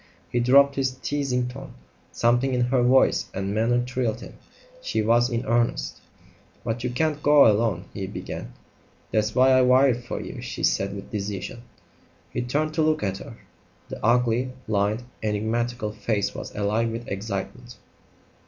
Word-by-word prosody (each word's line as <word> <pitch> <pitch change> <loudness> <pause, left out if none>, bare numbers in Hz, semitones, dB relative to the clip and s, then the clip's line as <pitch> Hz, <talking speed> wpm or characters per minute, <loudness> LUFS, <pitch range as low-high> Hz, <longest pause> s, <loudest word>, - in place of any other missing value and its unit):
He 120 - +1
dropped 140 +3 +5
his 130 -1 0
teasing 130 -2 -1
tone. 130 +2 -9 0.4
Something 120 +3 +2
in 125 - +1
her 125 +1 +2
voice 130 +2 +3
and 95 +1 -2
manner 120 +3 +2
thrilled 125 -3 -2
him. - - -10 0.5
She 110 - -1
was 120 +3 +3
in 120 0 -2
earnest. 120 +1 0 0.6
"But 115 0 -3
you 125 - 0
can't 150 +4 -1
go 145 -1 +6
alone 105 -4 +2
" - - -29
he 95 -1 -4
began. - - -7 0.6
"That's 110 0 0
why 130 +1 +5
I 130 0 +6
wired 125 -1 +4
for 120 - -5
you," - - -7
she - - -6
said 100 +1 +1
with 100 - -9
decision. 105 +2 -4 0.7
He - - -2
turned 150 +6 -1
to 160 - +1
look 155 0 +1
at 95 -1 -2
her. 115 - -10 0.5
The - - -8
ugly, 120 +2 +2
lined, 105 +2 0 0.2
enigmatical 110 +2 -1
face 105 -2 -1
was - - -8
alive 105 +3 0
with 115 +1 -6
excitement. 100 +4 -5
120 Hz, 160 wpm, -25 LUFS, 110-130 Hz, 0.7 s, go